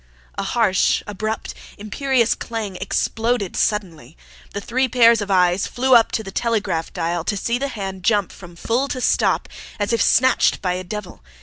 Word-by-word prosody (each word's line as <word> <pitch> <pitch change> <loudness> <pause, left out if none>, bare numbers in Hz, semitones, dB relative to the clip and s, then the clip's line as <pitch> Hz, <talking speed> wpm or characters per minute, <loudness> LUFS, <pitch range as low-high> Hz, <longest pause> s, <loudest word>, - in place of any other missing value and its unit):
A - - -4
harsh, 195 -1 +1
abrupt, 215 +2 -4 0.2
imperious 240 +3 0
clang 220 -4 -5
exploded 225 -2 -1
suddenly. 170 - -2 0.3
The 200 - -4
three 260 +5 0
pairs 235 -2 +5
of 205 - -5
eyes 180 0 +2
flew 260 +1 +1
up 230 -2 +6
to 220 - -1
the 195 - -8
telegraph 210 -7 -1
dial 170 0 -2
to 205 - -1
see 235 +5 -1
the 280 - -1
hand 195 -7 -6
jump 205 0 +1
from 175 -2 -13
FULL 235 +9 -1
to 255 - -4
STOP, - - +1 0.3
as 205 +3 -1
if 230 - +1
snatched 260 +2 +3
by 180 -2 -1
a 185 +1 -4
devil. 195 0 -7
210 Hz, 175 wpm, -21 LUFS, 185-235 Hz, 0.3 s, up